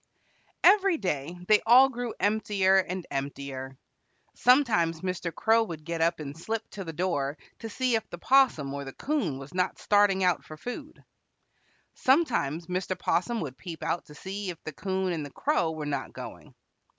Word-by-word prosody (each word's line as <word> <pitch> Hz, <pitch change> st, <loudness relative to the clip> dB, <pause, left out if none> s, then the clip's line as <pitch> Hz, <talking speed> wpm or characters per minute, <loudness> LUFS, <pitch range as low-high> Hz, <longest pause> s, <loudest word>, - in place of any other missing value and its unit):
Every 390 Hz, -3 st, +6 dB
day 170 Hz, -, -3 dB
they 210 Hz, -1 st, +5 dB
all 250 Hz, +4 st, +7 dB
grew 245 Hz, -3 st, -5 dB
emptier 205 Hz, -2 st, +2 dB
and 185 Hz, -1 st, -3 dB
emptier. 135 Hz, -1 st, -5 dB, 0.6 s
Sometimes 210 Hz, -, +3 dB
Mr. 180 Hz, -2 st, -3 dB
Crow 225 Hz, +6 st, +3 dB
would 160 Hz, -6 st, -8 dB
get 170 Hz, -1 st, -3 dB
up 170 Hz, 0 st, +2 dB
and 145 Hz, -2 st, -6 dB
slip 220 Hz, +7 st, -4 dB
to 195 Hz, -, -6 dB
the 165 Hz, -, -6 dB
door 150 Hz, -4 st, -1 dB, 0.2 s
to 225 Hz, -, -6 dB
see 255 Hz, +3 st, 0 dB
if 220 Hz, -1 st, 0 dB
the 175 Hz, -, -7 dB
'Possum 175 Hz, -, +3 dB
or 140 Hz, 0 st, -4 dB
the 135 Hz, -1 st, -8 dB
'Coon 250 Hz, -, -1 dB
was 135 Hz, +3 st, -10 dB
not 180 Hz, 0 st, 0 dB
starting 205 Hz, -2 st, +3 dB
out 180 Hz, -2 st, +2 dB
for 155 Hz, -, -11 dB
food. 245 Hz, -, -8 dB, 0.9 s
Sometimes 235 Hz, -, +1 dB
Mr. 185 Hz, +1 st, -2 dB
'Possum 230 Hz, +6 st, 0 dB
would 135 Hz, -6 st, -6 dB
peep 165 Hz, +2 st, -7 dB
out 170 Hz, +2 st, -1 dB
to 150 Hz, -, -14 dB
see 195 Hz, +3 st, -5 dB
if 175 Hz, -, -5 dB
the 155 Hz, -, -6 dB
'Coon 190 Hz, +2 st, -1 dB
and 160 Hz, -3 st, -3 dB
the 145 Hz, -, -7 dB
Crow 175 Hz, -, 0 dB
were 155 Hz, -1 st, -5 dB
not 140 Hz, -2 st, -3 dB
going. -, -, -10 dB
180 Hz, 175 wpm, -28 LUFS, 155-220 Hz, 0.9 s, all